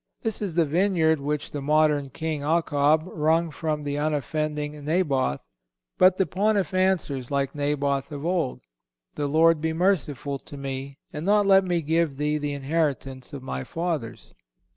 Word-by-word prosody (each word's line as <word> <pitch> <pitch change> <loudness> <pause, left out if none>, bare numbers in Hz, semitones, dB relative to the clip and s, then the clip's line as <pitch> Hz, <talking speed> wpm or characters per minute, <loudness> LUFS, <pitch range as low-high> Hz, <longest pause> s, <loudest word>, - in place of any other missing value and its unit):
This 225 -3 -2
is 190 -6 -3
the 170 -2 +4
vineyard 160 -1 +2
which 145 +1 -3
the 145 - -4
modern 150 -1 +2
King 155 +1 -3
Achab 155 -1 +2
wrung 160 0 +1
from 150 0 -3
the 145 0 -2
unoffending 150 0 -2
Naboth. 145 - 0 0.6
But 185 0 +6
the 190 - +3
Pontiff 200 -2 0
answers, 180 -9 0
like 140 -1 -1
Naboth 145 -1 -1
of 145 +1 -6
old: 170 - -1 0.5
"The 145 - -2
Lord 160 +2 +4
be 160 0 0
merciful 150 -6 0
to 145 - -11
me, 135 0 -5 0.2
and 150 -1 -5
not 205 +2 +3
let 195 0 +6
me 175 -3 0
give 160 -2 +1
thee 150 +1 0
the 145 -1 -2
inheritance 135 -3 -2
of 140 -3 -7
my 65 - -4
fathers." 165 - -4
150 Hz, 160 wpm, -25 LUFS, 140-170 Hz, 0.6 s, But